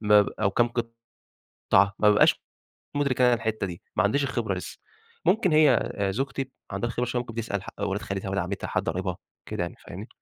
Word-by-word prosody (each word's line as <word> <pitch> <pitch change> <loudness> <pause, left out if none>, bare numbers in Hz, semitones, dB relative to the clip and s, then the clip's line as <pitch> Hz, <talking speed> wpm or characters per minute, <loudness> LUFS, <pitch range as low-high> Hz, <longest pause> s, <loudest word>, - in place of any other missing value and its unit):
ما 105 -1 +6
ب - - -3
أو 100 - +3
كام 120 +4 +3 0.8
قطعة 100 0 +2
ما 105 - +5
بابقاش 105 - +4 0.5
مدرك 140 -3 +1
أنا 125 -1 +6
الحتة 110 -3 -2
دي، 85 -2 -8
ما 105 - +4
عنديش 140 +8 +2
الخبرة 135 - -1
لسه - - -7 0.5
ممكن 195 -5 +3
هي 150 -5 +4 0.2
زوجتي 135 +2 -3 0.2
عندها 100 +4 -2
خبرة 125 +1 -1
شوية 125 0 -1
بتسأل 115 -4 -4
ح - - -12
ولاد 100 0 -1
خالتها، 95 0 -4
ولاد 95 -1 0
عمتها 95 +2 -4
حد - - -1
قرايبها، 90 +1 -2 0.3
كده - - -3
يعني، 85 - -4
فاهمني؟ 100 +7 -8
105 Hz, 190 wpm, -26 LUFS, 100-125 Hz, 0.8 s, ما